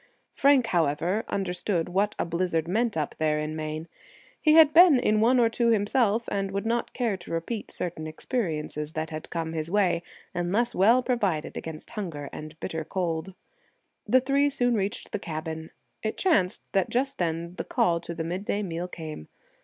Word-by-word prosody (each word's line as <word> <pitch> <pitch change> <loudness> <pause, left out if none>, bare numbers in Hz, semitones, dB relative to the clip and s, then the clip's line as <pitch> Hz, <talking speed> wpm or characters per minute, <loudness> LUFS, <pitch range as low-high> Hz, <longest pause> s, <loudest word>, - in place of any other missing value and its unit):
Frank, 275 -3 +4
however, 175 +2 +1
understood 180 -2 -1
what 195 +4 0
a - - 0
blizzard 170 -1 -1
meant 220 +2 0
up 150 -2 -1
there 155 -1 +2
in 150 +1 -3
Maine. 155 +1 -4 0.5
He 305 - +5
had 315 -2 +7
been 335 -4 +8
in 215 -3 +2
one 250 +3 +4
or 235 - +5
two 235 +1 0
himself, 225 +1 +2
and 195 -1 -1
would 200 +2 -3
not 235 +1 0
care 235 -5 0
to 175 - -13
repeat 165 +7 -3
certain 160 -3 -4
experiences 155 - -3
that 155 0 -3
had 155 0 -6
come 165 -1 -3
his 160 0 -3
way, 180 -4 +2 0.3
unless 195 +8 0
well 230 +7 +5
provided 205 -11 -1
against 160 -1 -7
hunger 165 -10 -5
and 155 +1 -8
bitter 160 0 -3
cold. 175 +1 -3 0.7
The 255 +5 +5
three 280 +2 +2
soon 245 -3 +1
reached 200 -2 -2
the 210 - -2
cabin. 160 -2 -5 0.3
It 220 - -3
chanced 200 - +2
that 195 -2 +1
just 270 +3 -1
then 170 0 -2
the - - -2
call 170 -1 +1
to 170 0 -7
the 165 - -3
midday 190 +5 -2
meal 175 -1 -3
came. 155 - -8
180 Hz, 175 wpm, -27 LUFS, 160-230 Hz, 0.7 s, been